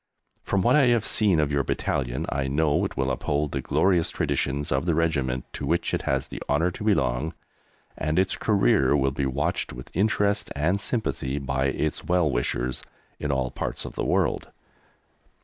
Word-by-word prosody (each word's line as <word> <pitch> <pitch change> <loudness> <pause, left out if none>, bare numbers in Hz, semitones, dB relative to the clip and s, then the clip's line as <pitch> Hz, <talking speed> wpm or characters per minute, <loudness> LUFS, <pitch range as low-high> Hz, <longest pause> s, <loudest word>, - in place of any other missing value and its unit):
From 100 -2 0
what - - +4
I 140 -4 +5
have 120 -3 +3
seen 100 -7 +3
of 75 -1 +1
your 70 -1 +2
battalion 65 -2 -1
I 70 -1 -1
know 75 +2 +2
it - - -5
will - - +1
uphold 75 0 -1
the 70 - -2
glorious 90 +3 +2
traditions 70 +2 -1
of 65 +6 0
the 85 - +2
Regiment 70 -6 0
to - - -6
which - - 0
it - - 0
has 65 0 +1
the - - -8
honour 80 +5 +2
to 95 - -8
belong, 80 - +1 0.6
and 75 +2 -1
its 95 0 +2
career 65 - +3
will 70 -1 +1
be 70 0 -1
watched 75 +6 -1
with 60 +1 -10
interest 100 +1 +1
and 90 +8 +1
sympathy 85 - -2
by 70 -1 -1
its 75 +3 -1
well 90 -2 +2
wishers 60 +1 -1 0.4
in 75 - -1
all 65 -2 -1
parts - - -3
of - - -7
the - - -3
world. - - +1
75 Hz, 185 wpm, -25 LUFS, 65-90 Hz, 0.6 s, I